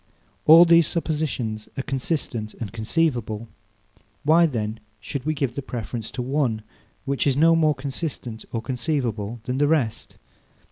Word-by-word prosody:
All 165 +3 +10
these 170 -2 +6
suppositions 145 -10 -2
are 135 - -1
consistent 130 -5 -2
and 115 -3 -6
conceivable. 115 -2 -1 0.8
Why 165 +3 +5
then 110 -5 -3 0.2
should 135 +7 -5
we 155 - +1
give 135 -4 -1
the 140 - -4
preference 120 -3 -5
to 125 - -3
one, 125 -5 0 0.4
which 140 +1 0
is 135 -1 +2
no 165 +2 +6
more 155 -2 +3
consistent 130 -4 -5
or 115 -1 -3
conceivable 120 -4 -2
than 125 +2 -2
the 145 - +4
rest? 145 -8 0
130 Hz, 145 wpm, -24 LUFS, 115-155 Hz, 0.8 s, All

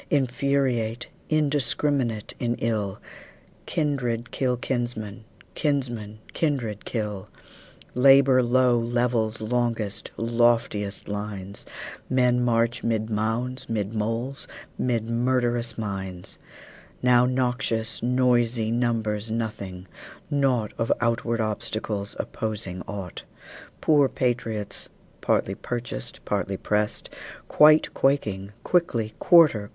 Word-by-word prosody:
Infuriate, 130 -4 +1 0.2
indiscrminate 145 -6 +1
in 120 -1 0
ill, 105 -5 -2 0.7
Kindred 125 -7 -1
kill 125 -2 0
kinsmen, 120 -4 -3 0.3
kinsmen 120 -8 -2 0.2
kindred 125 -10 -1
kill. 105 -4 -4 0.6
Labor 135 0 +6
low 125 0 +3
levels 115 -2 0
longest, 115 -2 -1
lofiest 115 -3 +1
lines; 100 -1 -5 0.4
Men 125 -1 +3
march 115 0 +1
'mid 110 -1 -1
mounds, 115 +5 -2
'mid 105 -2 -2
moles, 115 +5 -3 0.2
' - - -30
mid 115 -3 0
murderous 120 -1 0
mines; 95 -4 -5 0.6
Now 125 0 +5
noxious, 125 -3 0
noisey 120 -2 +2
numbers 115 -3 0
nothing, 105 -5 -4 0.4
naught 130 -6 +1
Of 115 - +1
outward 115 0 0
obstacles, 105 -1 -3
opposing 105 -4 -4
ought; 95 -4 -6 0.6
Poor 145 -3 +4
patriots, 115 -5 -2 0.3
partly 95 - +1
purchased, 120 - -6
partly 100 -1 -1
pressed, 105 +1 -1 0.4
Quite 155 +1 +6
quaking, 105 -8 0
quickly 120 -11 +1
"Quarter! 150 -12 +5
115 Hz, 95 wpm, -25 LUFS, 110-125 Hz, 0.7 s, Labor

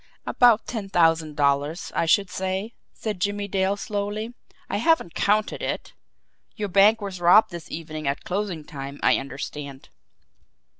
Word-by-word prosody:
"About 240 -3 +4
ten 215 -5 -5
thousand 165 -4 +2
dollars, 145 +3 0
I 165 - 0
should 195 +3 +3
say," 190 +4 -3 0.2
said 210 -5 -5
Jimmie 205 +1 -1
Dale 195 0 0
slowly. 210 +2 -3 0.3
"I - - -2
haven't 325 - +2
counted 210 +1 +1
it. - - -4 0.6
Your 210 -3 -3
bank 205 +4 +5
was 190 -3 -6
robbed 180 +6 +6
this 170 -2 -8
evening 155 -2 -6
at 140 +1 -2
closing 185 -4 -3
time, 140 -1 -8
I - - +5
understand?" 140 0 -7
190 Hz, 145 wpm, -24 LUFS, 155-205 Hz, 0.6 s, robbed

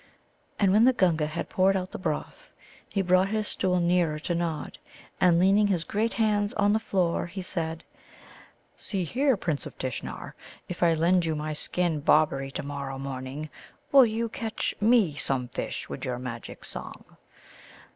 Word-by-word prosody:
And 195 -2 +3
when 215 +4 +5
the 260 - +5
Gunga 165 -8 +2
had 155 +2 -4
poured 190 +1 +3
out 185 0 -4
the - - -6
broth, - - -4 0.4
he 195 - 0
brought 185 +1 +4
his 215 0 -1
stool 180 -1 +1
nearer 170 -3 +2
to 155 +3 -3
Nod, 165 -4 -3 0.4
and, 175 -2 +5
leaning 195 +4 +4
his 180 -5 +1
great 220 +6 -1
hands 210 -2 +1
on 205 0 +3
the 220 - +2
floor, 180 -6 0
he 185 +2 -6
said: 165 -3 -3 0.9
"See 195 -3 -3
here, 260 - +1
Prince 160 -6 -2
of - - -13
Tishnar, 130 -2 -5 0.3
if 180 - -7
I 170 -2 +4
lend 170 +2 +3
you 160 - 0
my 155 0 -3
skin 165 +1 -1
Bobberie 140 -3 +3
to - - -4
morrow 140 -1 -5
morning, 135 +2 -6 0.4
will 270 -3 +8
you 225 +1 -1
catch 225 -1 -3
me 215 -7 +4
some 125 -4 -1
fish - - -4
with 70 - -7
your 125 -1 -2
magic 125 -2 -7
song?" - - -7
175 Hz, 170 wpm, -27 LUFS, 150-205 Hz, 0.9 s, will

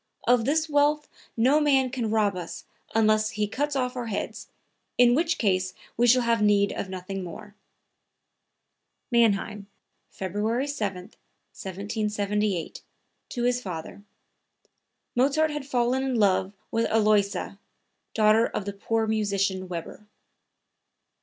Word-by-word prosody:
Of 240 -2 +4
this 310 +4 +1
wealth 295 0 +2 0.3
no 260 +7 +4
man 270 -4 +3
can 240 -4 -2
rob 210 -3 +2
us 175 -2 -7 0.3
unless 215 -1 +3
he 210 -1 -1
cuts 290 +6 -2
off 250 -1 -1
our 245 -2 -4
heads, 210 - -4 0.5
in 245 -1 +6
which 320 +4 +1
case 185 -3 0 0.2
we 240 +1 +3
should 250 +1 +5
have 230 -1 +2
need 205 -1 +3
of 190 - -4
nothing 190 +1 -5
more." 205 +4 -9 1.6
(Mannheim, 210 -3 +2 0.4
February 210 +7 -2
7, 210 -10 -3 0.5
1778, 205 -1 -2 0.5
to 240 - -3
his 245 0 +1
father. 180 -1 -7 1.1
Mozart 290 +5 +2
had 295 -2 -5
fallen 250 -1 +1
in 265 -1 -1
love 195 -3 +2 0.2
with 230 0 +1
Aloysia, 210 -2 +1 0.6
daughter 220 +1 +4
of 200 - -4
the 200 - -4
poor 225 +3 -1
musician 200 -3 0
Weber.) 180 +4 -7
220 Hz, 125 wpm, -26 LUFS, 200-250 Hz, 1.6 s, in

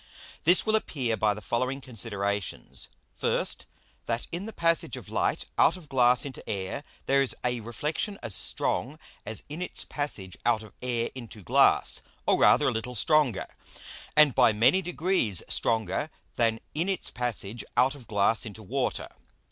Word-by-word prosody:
_ - - -40
This 175 +3 +6
will 220 0 +3
appear 130 - -1
by 105 -1 +1
the 105 - -9
following 130 +7 -1
Considerations. 100 -6 -3 0.3
First, - - 0 0.4
That 115 0 -1
in 180 +5 -4
the - - -5
passage 165 -4 +1
of - - -10
Light - - 0
out - - +5
of 160 -5 -15
Glass 125 -1 +4
into 135 -3 -7
Air 100 +8 -3 0.2
there 140 0 +3
is 135 - 0
a 125 -1 0
Reflexion 150 - -3
as 110 - 0
strong - - +1 0.3
as 110 -1 -1
in 150 +4 -6
its 180 - -2
passage 105 -11 -4
out 115 -2 +2
of 110 - -14
Air 120 -2 -1
into 115 -5 -9
Glass, - - +3 0.2
or - - +3
rather - - +5
a - - -1
little 125 +3 -4
stronger, 145 -2 +3 0.7
and 150 -3 +6
by 125 -3 +5
many 115 - +4
degrees 175 - +1
stronger 115 +7 +2 0.3
than 115 -1 +1
in 165 +5 0
its 190 - -1
passage 120 -2 -2
out 130 +2 +4
of 135 -6 -13
Glass 105 +1 +2
into 110 -1 -7
Water. 95 - -2
120 Hz, 165 wpm, -27 LUFS, 110-150 Hz, 0.7 s, This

